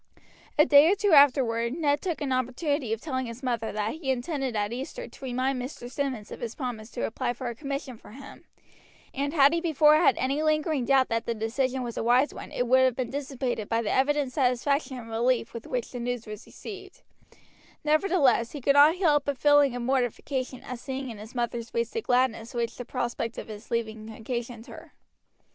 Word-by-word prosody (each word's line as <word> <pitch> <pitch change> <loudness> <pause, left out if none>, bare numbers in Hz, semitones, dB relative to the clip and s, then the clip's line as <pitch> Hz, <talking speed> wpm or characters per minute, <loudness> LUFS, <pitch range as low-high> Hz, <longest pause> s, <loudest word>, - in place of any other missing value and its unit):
A 300 - +7
day 295 +2 +7
or - - +3
two 410 -1 +1
afterward 250 -5 +4
Ned 290 -3 +1
took 345 -4 -3
an 280 -2 -2
opportunity 255 +1 -1
of 225 - -1
telling 260 -5 -3
his 230 +3 -9
mother 235 -3 -1
that 210 +1 -2
he 310 -3 -5
intended 265 -1 -2
at 205 +1 -1
Easter 280 - -6
to - - -16
remind 255 +1 -1
Mr. 245 -1 -7
Simmonds 260 -7 -3
of - - -7
his 230 -1 -5
promise 240 -5 -5
to 245 - -2
apply 240 +2 -2
for 245 0 -5
a - - -4
commission 275 -1 -5
for - - -15
him; 275 +3 -12 0.7
and 280 +1 -2
had 285 -1 +5
he 335 - 0
before 305 -2 +5
had 340 - +4
any 275 +3 0
lingering 305 -3 +1
doubt 270 -1 +3
that 230 0 -1
the 235 - -1
decision 255 +4 -1
was 235 -1 -6
a - - -1
wise 250 +5 +3
one - - -9
it 245 - -1
would 260 +2 +4
have 260 -2 +3
been 250 -2 -3
dissipated 265 -5 -3
by 230 0 +1
the 210 - -1
evident 280 -1 +1
satisfaction 270 +1 0
and 230 -2 -9
relief 235 +1 0
with 230 -1 -8
which 245 -2 -3
the 245 - -6
news 245 -1 -3
was 215 -1 -9
received; 390 -2 -10 0.8
nevertheless, 300 -7 +2
he 295 - -5
could 280 +3 +3
not 290 +3 +7
help 300 -6 +2
a 285 - 0
feeling 285 0 +4
of 245 - -4
mortification 255 +1 -2
at 250 -1 -7
seeing 265 0 -5
in 215 - -10
his 215 +4 -11
mother's 235 -1 -2
face 235 0 -2
the 455 - -2
gladness 245 - 0
which 235 -1 -2
the 245 - -5
prospect 240 -2 -3
of - - -7
his 215 +1 -9
leaving 220 -2 -3
occasioned 235 +1 -5
her. - - -12
255 Hz, 210 wpm, -27 LUFS, 235-285 Hz, 0.8 s, A